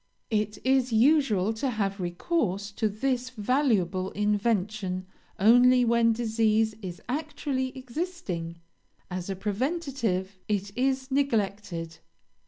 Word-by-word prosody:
It 210 Hz, -1 st, 0 dB
is 260 Hz, -1 st, +2 dB
usual 225 Hz, -5 st, +3 dB
to 240 Hz, +5 st, -2 dB
have 200 Hz, -4 st, -2 dB
recourse 200 Hz, -, -1 dB
to 215 Hz, +2 st, 0 dB
this 250 Hz, +4 st, -1 dB
valuable 210 Hz, -, +1 dB
invention 205 Hz, -2 st, 0 dB, 0.3 s
only 245 Hz, +4 st, +6 dB
when 230 Hz, 0 st, +4 dB
disease 220 Hz, -1 st, +1 dB
is 180 Hz, -3 st, -7 dB
actually 285 Hz, -1 st, -2 dB
existing 255 Hz, -, -4 dB, 0.5 s
as 180 Hz, +1 st, -4 dB
a 195 Hz, -, -2 dB
preventive, 215 Hz, -, -2 dB
it 200 Hz, -1 st, -2 dB
is 265 Hz, +1 st, 0 dB
neglected. 200 Hz, -11 st, -1 dB
220 Hz, 105 wpm, -27 LUFS, 195-260 Hz, 0.5 s, only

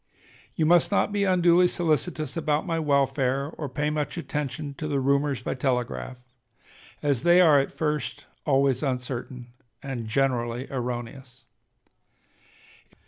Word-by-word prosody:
You 160 Hz, -, +1 dB
must 175 Hz, +3 st, +4 dB
not 205 Hz, -, +2 dB
be 205 Hz, -1 st, +1 dB
unduly 180 Hz, -1 st, +4 dB
solicitous 155 Hz, -3 st, -1 dB
about 155 Hz, -2 st, 0 dB
my 165 Hz, -3 st, -1 dB
welfare, 140 Hz, -1 st, +1 dB
or 150 Hz, -4 st, -6 dB
pay 150 Hz, +3 st, -1 dB
much 150 Hz, +2 st, -3 dB
attention 150 Hz, -2 st, -4 dB
to 155 Hz, -, -3 dB
the 145 Hz, -2 st, 0 dB
rumors 140 Hz, 0 st, +1 dB
by -, -, -3 dB
telegraph, 125 Hz, -1 st, -2 dB, 0.9 s
as 140 Hz, -5 st, +1 dB
they 175 Hz, +2 st, +5 dB
are 155 Hz, -5 st, +6 dB
at 135 Hz, -, -1 dB
first 150 Hz, -1 st, -3 dB, 0.2 s
always 135 Hz, -3 st, +2 dB
uncertain 125 Hz, -2 st, -4 dB, 0.3 s
and 130 Hz, -5 st, -5 dB
generally 120 Hz, 0 st, 0 dB
erroneous. 125 Hz, +1 st, -6 dB
140 Hz, 130 wpm, -26 LUFS, 130-155 Hz, 0.9 s, are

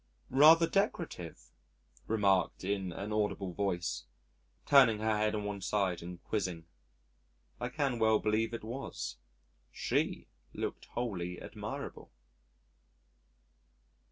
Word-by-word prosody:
"Rather 160 Hz, +5 st, +8 dB
decorative," 165 Hz, -, -2 dB, 0.6 s
remarked 100 Hz, -5 st, +2 dB
in 95 Hz, -1 st, -1 dB
an 100 Hz, +5 st, -5 dB
audible 105 Hz, -3 st, -1 dB
voice, 90 Hz, -9 st, -2 dB, 0.6 s
turning 130 Hz, -6 st, +6 dB
her 110 Hz, 0 st, +1 dB
head 105 Hz, 0 st, +1 dB
on 105 Hz, -, -2 dB
one 100 Hz, -1 st, -4 dB
side 95 Hz, -3 st, 0 dB
and 90 Hz, 0 st, -8 dB
quizzing. 90 Hz, -6 st, -2 dB, 0.9 s
I 120 Hz, -, -2 dB
can 135 Hz, -3 st, -1 dB
well 110 Hz, -1 st, +5 dB
believe 110 Hz, +2 st, +1 dB
it 115 Hz, -, -5 dB
was. 110 Hz, -, -5 dB, 0.5 s
She -, -, -1 dB, 0.3 s
looked -, -, -4 dB
wholly 90 Hz, -7 st, -3 dB
admirable. -, -, -7 dB
105 Hz, 105 wpm, -32 LUFS, 95-115 Hz, 0.9 s, Rather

